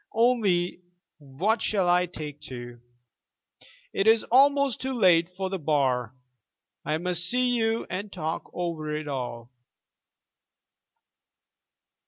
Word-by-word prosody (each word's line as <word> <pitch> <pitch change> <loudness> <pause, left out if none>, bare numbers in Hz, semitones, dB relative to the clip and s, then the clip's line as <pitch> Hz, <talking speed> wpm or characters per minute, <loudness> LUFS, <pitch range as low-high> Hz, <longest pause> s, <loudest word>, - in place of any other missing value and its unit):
Only 210 -8 +2 0.4
what 165 - -1
shall 195 -4 +1
I 180 0 +3
take 150 -4 -8
to? 120 -2 -9 1.1
It 195 - 0
is 225 0 +5
almost 280 0 +4
too 265 0 -2
late 180 -7 +4
for 190 -1 -3
the 190 - -2
Bar. 130 -6 0 0.7
I 155 - -1
must 175 +1 0
see 250 0 +2
you 225 -2 0
and 200 +2 -5
talk 160 -3 -4
over 160 -4 -3
it 155 0 -5
all. 125 -3 -5
180 Hz, 115 wpm, -26 LUFS, 150-220 Hz, 1.1 s, is